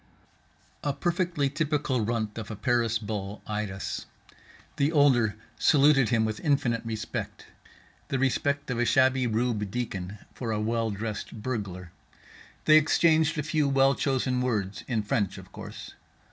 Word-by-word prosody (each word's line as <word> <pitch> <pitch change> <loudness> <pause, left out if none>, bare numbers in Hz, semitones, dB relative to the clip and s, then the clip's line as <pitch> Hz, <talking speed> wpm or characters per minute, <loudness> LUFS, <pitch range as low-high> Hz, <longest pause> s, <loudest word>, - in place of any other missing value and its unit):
A 145 - 0
perfectly 170 -3 0
typical 145 -4 0
runt 110 -1 -2
of 110 - -7
a 110 - -5
Paris 115 +1 +1
bull 105 -2 -5
eyed 105 -1 -2
us. 95 0 -5 0.7
The 140 +2 +2
older 130 -8 +4 0.2
saluted 140 -4 +5
him 115 -2 +2
with 110 0 -3
infinite 135 -6 +1
respect, 110 -2 -5 0.6
the 135 - -1
respect 140 +1 0
of 120 - -2
a 120 - +2
shabby 130 0 +3
rube 110 -2 0
deacon 100 -4 -4 0.2
for 115 -3 -4
a 105 - -1
well 115 +1 0
dressed 105 +1 -5
burglar. 95 -8 -4 0.7
They 155 0 +8
exchanged 160 +1 +3
a 150 - 0
few 155 -2 +1
well 135 0 +4
chosen 130 -2 0
words, 105 -6 -2
in 110 -4 0
French 105 -3 -1
of - - -12
course. - - -9
120 Hz, 145 wpm, -27 LUFS, 110-140 Hz, 0.7 s, They